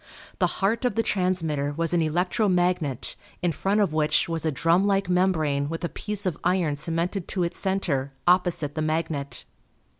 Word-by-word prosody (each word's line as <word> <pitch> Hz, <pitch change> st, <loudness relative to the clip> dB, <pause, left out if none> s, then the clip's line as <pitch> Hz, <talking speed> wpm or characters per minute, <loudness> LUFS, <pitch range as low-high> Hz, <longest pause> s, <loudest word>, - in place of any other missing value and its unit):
The -, -, +4 dB
heart 220 Hz, +4 st, +1 dB
of 245 Hz, -4 st, 0 dB
the 225 Hz, -, +2 dB
transmitter 165 Hz, -8 st, 0 dB
was 165 Hz, +2 st, -1 dB
an 175 Hz, -, +3 dB
electro 180 Hz, +6 st, +1 dB
magnet 175 Hz, -7 st, 0 dB, 0.3 s
in 175 Hz, -, +2 dB
front 195 Hz, +6 st, +1 dB
of 190 Hz, -6 st, +1 dB
which 155 Hz, -1 st, +2 dB
was 165 Hz, -1 st, -2 dB
a -, -, +1 dB
drum 165 Hz, +7 st, +2 dB
like 195 Hz, -2 st, +1 dB
membrane 160 Hz, -6 st, +1 dB
with 165 Hz, +2 st, -5 dB
a 170 Hz, -, -1 dB
piece 210 Hz, -1 st, -3 dB
of 180 Hz, -5 st, -1 dB
iron 175 Hz, -4 st, +1 dB
cemented 170 Hz, +5 st, -2 dB
to 185 Hz, -3 st, -1 dB
its 170 Hz, -, -2 dB
center 165 Hz, -9 st, 0 dB, 0.2 s
opposite 175 Hz, -5 st, +3 dB
the 155 Hz, -, -3 dB
magnet. 155 Hz, -2 st, -2 dB
170 Hz, 180 wpm, -25 LUFS, 155-190 Hz, 0.3 s, The